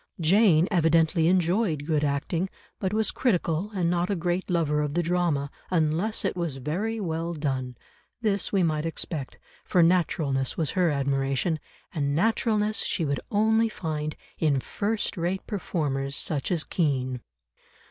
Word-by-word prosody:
Jane 175 Hz, 0 st, +4 dB
evidently 165 Hz, -1 st, +3 dB
enjoyed 175 Hz, -3 st, +1 dB
good 155 Hz, -2 st, +1 dB
acting, 150 Hz, +6 st, -1 dB, 0.3 s
but 190 Hz, -, -1 dB
was 220 Hz, +1 st, +1 dB
critical 180 Hz, -5 st, 0 dB
and 180 Hz, -3 st, +1 dB
not 175 Hz, +1 st, +1 dB
a 200 Hz, -, +1 dB
great 175 Hz, +2 st, -2 dB
lover 155 Hz, -4 st, +1 dB
of 145 Hz, -1 st, -2 dB
the 175 Hz, -, +2 dB
drama 165 Hz, -5 st, 0 dB, 0.2 s
unless 175 Hz, +6 st, +1 dB
it 190 Hz, -, 0 dB
was 170 Hz, -6 st, -2 dB
very 195 Hz, -, -2 dB
well 165 Hz, -2 st, -2 dB
done; 130 Hz, -5 st, -3 dB, 0.4 s
this 205 Hz, -4 st, 0 dB
we 195 Hz, -3 st, +2 dB
might 155 Hz, -2 st, 0 dB
expect, 160 Hz, -4 st, -4 dB, 0.3 s
for 175 Hz, -, +3 dB
naturalness 155 Hz, -6 st, +1 dB
was 160 Hz, -3 st, 0 dB
her 180 Hz, -2 st, +2 dB
admiration, 140 Hz, +2 st, 0 dB, 0.3 s
and 140 Hz, -4 st, 0 dB
naturalness 215 Hz, +2 st, +1 dB
she 165 Hz, -, 0 dB
would 140 Hz, -1 st, -1 dB
only 220 Hz, +2 st, +3 dB
find 155 Hz, -6 st, -4 dB, 0.2 s
in 145 Hz, -4 st, +2 dB
first 205 Hz, -, -2 dB
rate 175 Hz, +3 st, -2 dB
performers 145 Hz, -9 st, -2 dB
such 145 Hz, 0 st, 0 dB
as 165 Hz, -3 st, +2 dB
Kean. 130 Hz, -6 st, -1 dB
165 Hz, 145 wpm, -26 LUFS, 150-185 Hz, 0.4 s, Jane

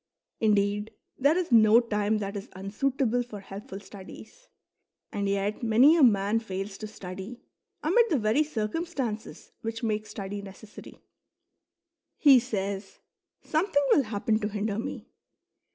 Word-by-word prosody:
Indeed, 205 Hz, 0 st, +1 dB, 0.2 s
there 285 Hz, +5 st, +4 dB
is 360 Hz, -6 st, -2 dB
no 220 Hz, 0 st, +7 dB
time 215 Hz, -2 st, 0 dB
that 200 Hz, 0 st, -4 dB
is 200 Hz, -, -6 dB
unsuitable 245 Hz, +5 st, -1 dB
for 235 Hz, -4 st, -8 dB
helpful 195 Hz, 0 st, -9 dB
studies; 205 Hz, -, -13 dB, 0.6 s
and 200 Hz, -1 st, -2 dB
yet 200 Hz, +1 st, -1 dB
many 240 Hz, +7 st, +5 dB
a 335 Hz, -, +3 dB
man 210 Hz, -3 st, +4 dB
fails 195 Hz, -2 st, -6 dB
to 215 Hz, -, -5 dB
study 195 Hz, +3 st, -9 dB, 0.4 s
amid 460 Hz, +9 st, +3 dB
the 315 Hz, -, +2 dB
very 220 Hz, +6 st, +2 dB
circumstances 255 Hz, -2 st, -4 dB
which 225 Hz, +1 st, -5 dB
make 215 Hz, -1 st, -1 dB
study 200 Hz, 0 st, -6 dB
necessary. 200 Hz, +2 st, -12 dB, 1.1 s
He 275 Hz, -4 st, +7 dB
says: 200 Hz, -4 st, -4 dB, 0.2 s
" -, -, -61 dB, 0.2 s
Something 310 Hz, -2 st, +1 dB
will 280 Hz, -, +5 dB
happen 215 Hz, 0 st, 0 dB
to 210 Hz, -, -2 dB
hinder 210 Hz, 0 st, -2 dB
me." -, -, -5 dB
215 Hz, 135 wpm, -27 LUFS, 200-250 Hz, 1.1 s, no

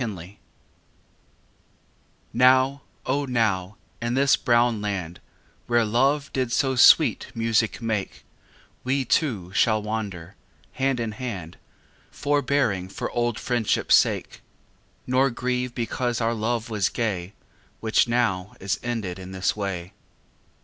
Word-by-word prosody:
XXXIII 100 Hz, -3 st, -7 dB, 1.9 s
Now, 130 Hz, +2 st, +4 dB, 0.2 s
O 140 Hz, +2 st, 0 dB
now, 105 Hz, -6 st, 0 dB, 0.2 s
in 120 Hz, +1 st, -1 dB
this 135 Hz, +1 st, +4 dB
brown 120 Hz, -2 st, +2 dB
land 95 Hz, -5 st, -4 dB, 0.5 s
Where 120 Hz, -1 st, +3 dB
Love 135 Hz, +6 st, +1 dB
did 130 Hz, -3 st, -1 dB
so 130 Hz, +1 st, +1 dB
sweet 120 Hz, -, +6 dB
music 115 Hz, 0 st, 0 dB
make 110 Hz, -4 st, -3 dB, 0.6 s
We 130 Hz, +1 st, 0 dB
two 110 Hz, -, 0 dB
shall 110 Hz, +2 st, +3 dB
wander, 100 Hz, -5 st, -5 dB, 0.4 s
hand 135 Hz, -1 st, 0 dB
in 115 Hz, -2 st, -2 dB
hand, 105 Hz, -8 st, -6 dB, 0.5 s
Forbearing 140 Hz, -10 st, 0 dB
for -, -, -5 dB
old 120 Hz, -2 st, -1 dB
friendshipâ 120 Hz, -4 st, -1 dB
sake, -, -, +3 dB, 0.6 s
Nor 130 Hz, +2 st, +2 dB
grieve 125 Hz, 0 st, -2 dB
because 120 Hz, 0 st, -2 dB
our 115 Hz, 0 st, +1 dB
love 115 Hz, +1 st, -2 dB
was 105 Hz, -3 st, +1 dB
gay 100 Hz, -5 st, -3 dB, 0.5 s
Which 110 Hz, +1 st, +2 dB
now 110 Hz, -6 st, 0 dB
is 95 Hz, 0 st, -2 dB
ended 110 Hz, -7 st, -4 dB
in 95 Hz, 0 st, -9 dB
this 95 Hz, 0 st, 0 dB
way. 95 Hz, -3 st, -4 dB
115 Hz, 120 wpm, -24 LUFS, 100-125 Hz, 1.9 s, sweet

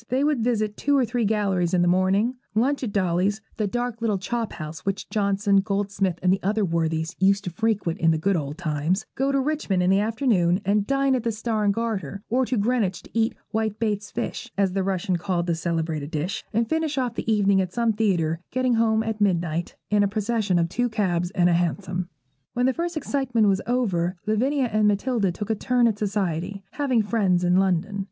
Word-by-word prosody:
They 260 Hz, +3 st, +1 dB
would 295 Hz, -3 st, +2 dB
visit 215 Hz, -3 st, 0 dB
two 285 Hz, 0 st, +2 dB
or 260 Hz, -, +3 dB
three 235 Hz, -1 st, -1 dB
galleries 195 Hz, -4 st, +1 dB
in 175 Hz, -, +3 dB
the -, -, +2 dB
morning, 190 Hz, +6 st, +2 dB, 0.2 s
lunch 270 Hz, +5 st, +1 dB
at 230 Hz, -, -2 dB
Dolly's 190 Hz, +1 st, +1 dB, 0.2 s
(the 215 Hz, -, 0 dB
dark 240 Hz, +1 st, -3 dB
little 215 Hz, -3 st, +1 dB
chop 225 Hz, +4 st, -3 dB
house 155 Hz, +1 st, -7 dB
which 195 Hz, 0 st, -3 dB
Johnson, 200 Hz, -1 st, +2 dB
Goldsmith, 195 Hz, -2 st, 0 dB
and 185 Hz, 0 st, +4 dB
the 190 Hz, -, -1 dB
other 210 Hz, +2 st, +1 dB
worthies 165 Hz, 0 st, -1 dB
used 195 Hz, +1 st, +3 dB
to 180 Hz, -, -4 dB
frequent 205 Hz, -4 st, -1 dB
in 165 Hz, -, +3 dB
the 160 Hz, -, +3 dB
good 195 Hz, +5 st, +1 dB
old 145 Hz, -2 st, -3 dB
times), 170 Hz, +4 st, -1 dB
go 270 Hz, +1 st, 0 dB
to 275 Hz, -, +2 dB
Richmond 265 Hz, -10 st, 0 dB
in 180 Hz, -, +3 dB
the 195 Hz, -, +4 dB
afternoon 210 Hz, -5 st, +2 dB
and 200 Hz, +1 st, +1 dB
dine 275 Hz, 0 st, +2 dB
at 255 Hz, -, +1 dB
the 230 Hz, -, -1 dB
'Star 220 Hz, 0 st, -2 dB
and 200 Hz, -, +4 dB
Garter,' 205 Hz, -2 st, -3 dB
or 250 Hz, +2 st, +1 dB
to 255 Hz, -, 0 dB
Greenwich 205 Hz, -4 st, 0 dB
and -, -, -16 dB
eat 225 Hz, 0 st, +1 dB, 0.2 s
'white 220 Hz, -1 st, -1 dB
baits 210 Hz, -2 st, -2 dB
fish,' 235 Hz, -, -5 dB
as 195 Hz, -2 st, +2 dB
the 195 Hz, -, 0 dB
Russian 185 Hz, -1 st, -1 dB
called 175 Hz, -1 st, -1 dB
that 175 Hz, -, 0 dB
celebrated 160 Hz, -3 st, -2 dB
dish, 170 Hz, +6 st, -3 dB
and 225 Hz, +1 st, +1 dB
finish 320 Hz, +1 st, -1 dB
off 250 Hz, -3 st, 0 dB
the 225 Hz, -, -2 dB
evening 200 Hz, -2 st, +3 dB
at 185 Hz, -1 st, -3 dB
some 230 Hz, +1 st, +1 dB
theatre, 175 Hz, -7 st, +1 dB
getting 255 Hz, -1 st, +1 dB
home 225 Hz, -1 st, +2 dB
at 220 Hz, -1 st, -4 dB
midnight, 170 Hz, -4 st, 0 dB, 0.2 s
in 210 Hz, 0 st, +4 dB
a 200 Hz, -, +3 dB
procession 215 Hz, -2 st, 0 dB
of 170 Hz, -1 st, +2 dB
two 245 Hz, +8 st, -1 dB
cabs 180 Hz, -6 st, 0 dB
and 175 Hz, -2 st, +4 dB
a 175 Hz, -, +3 dB
hansom. 175 Hz, +1 st, -1 dB, 0.4 s
When 245 Hz, +1 st, +1 dB
the 260 Hz, -, +3 dB
first 340 Hz, +1 st, -3 dB
excitement 265 Hz, -6 st, 0 dB
was 195 Hz, -1 st, +2 dB
over, 190 Hz, -8 st, 0 dB
Lavinia 255 Hz, +6 st, +1 dB
and 215 Hz, -1 st, +3 dB
Matilda 210 Hz, -1 st, +1 dB
took 210 Hz, +5 st, -4 dB
a -, -, +1 dB
turn 245 Hz, +3 st, +2 dB
at 215 Hz, -2 st, -1 dB
society, 195 Hz, -2 st, -2 dB
having 260 Hz, -6 st, +1 dB
friends 200 Hz, -5 st, +1 dB
in 180 Hz, +1 st, +3 dB
London. 195 Hz, +1 st, +1 dB
205 Hz, 215 wpm, -24 LUFS, 180-230 Hz, 0.4 s, and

